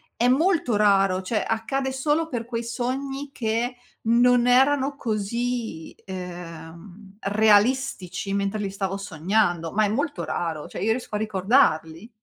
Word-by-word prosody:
È 240 Hz, -, +2 dB
molto 295 Hz, -, +2 dB
raro, 195 Hz, -2 st, +3 dB
cioè 210 Hz, +3 st, -1 dB
accade 265 Hz, +4 st, -1 dB
solo 295 Hz, +4 st, 0 dB
per 240 Hz, -7 st, -3 dB
quei 235 Hz, -1 st, -4 dB
sogni 270 Hz, +4 st, -3 dB
che 235 Hz, +1 st, -2 dB, 0.3 s
non 240 Hz, +1 st, +4 dB
erano 270 Hz, +2 st, +3 dB
così, 230 Hz, -, -3 dB
ehm, 180 Hz, +1 st, -9 dB
realistici 210 Hz, -1 st, +2 dB
mentre 200 Hz, +1 st, -1 dB
li 200 Hz, -1 st, -2 dB
stavo 195 Hz, 0 st, -3 dB
sognando, 175 Hz, -2 st, 0 dB
ma 215 Hz, +1 st, +2 dB
è -, -, +1 dB
molto 285 Hz, +7 st, -2 dB
raro. 160 Hz, -3 st, -3 dB
Cioè, -, -, -7 dB
io 220 Hz, -, +2 dB
riesco 230 Hz, -2 st, -3 dB
a -, -, +2 dB
ricordarli. 195 Hz, -, +1 dB
220 Hz, 135 wpm, -24 LUFS, 195-250 Hz, 0.3 s, non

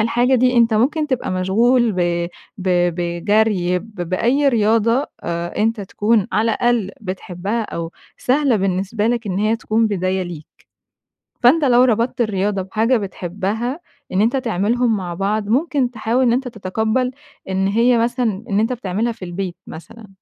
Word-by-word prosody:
الحاجة 240 Hz, +4 st, +2 dB
دي، 250 Hz, 0 st, +3 dB
أنتَ 230 Hz, -1 st, +4 dB
ممكن 300 Hz, +7 st, +1 dB
تبقى 260 Hz, -7 st, -2 dB
مشغول 225 Hz, +6 st, +2 dB
ب 175 Hz, -1 st, 0 dB, 0.3 s
ب 185 Hz, 0 st, -3 dB, 0.3 s
بجري 180 Hz, +1 st, +1 dB
ب 220 Hz, +3 st, -14 dB
بأي 250 Hz, +10 st, +2 dB
رياضة 230 Hz, +2 st, +2 dB
آآ، 170 Hz, 0 st, -4 dB
أنتَ 220 Hz, +1 st, +1 dB
تكون 210 Hz, +2 st, +1 dB
على 225 Hz, +2 st, +2 dB
الأقل 235 Hz, -5 st, +1 dB
بتحبها 195 Hz, +2 st, -4 dB
أو 170 Hz, -5 st, -5 dB, 0.2 s
سهلة 265 Hz, -2 st, +2 dB
بالنسبة 195 Hz, +3 st, -1 dB
لك، 235 Hz, -1 st, -1 dB
إن 190 Hz, -1 st, -2 dB
هي 215 Hz, +2 st, +1 dB
تكون 225 Hz, 0 st, +1 dB
بداية 190 Hz, -2 st, -1 dB
ليك. 170 Hz, -4 st, -8 dB, 1.0 s
فأنتَ 295 Hz, +6 st, +5 dB
لو 245 Hz, -1 st, +5 dB
ربطت 240 Hz, 0 st, +1 dB
الرياضة 200 Hz, -2 st, 0 dB
بحاجة 225 Hz, +6 st, +1 dB
بتحبها، 205 Hz, -, -3 dB, 0.3 s
إن 190 Hz, +2 st, +1 dB
أنتَ 230 Hz, +5 st, +2 dB
تعملهم 230 Hz, 0 st, +1 dB
مع 180 Hz, -2 st, -5 dB
بعض، 200 Hz, +3 st, -1 dB
ممكن 265 Hz, 0 st, +1 dB
تحاول 230 Hz, +3 st, 0 dB
إن 235 Hz, -, +3 dB
أنتَ 255 Hz, +1 st, -1 dB
تتقبَّل 220 Hz, +3 st, -1 dB, 0.4 s
إن 190 Hz, +1 st, 0 dB
هي 235 Hz, +4 st, +3 dB
مثلًا 230 Hz, -3 st, 0 dB
إن 200 Hz, +1 st, +1 dB
أنتَ 225 Hz, +3 st, +1 dB
بتعملها 225 Hz, +1 st, -2 dB
في 215 Hz, -5 st, -8 dB
البيت 180 Hz, 0 st, -4 dB
مثلًا. 220 Hz, +7 st, -11 dB
220 Hz, 155 wpm, -19 LUFS, 190-240 Hz, 1.0 s, فأنتَ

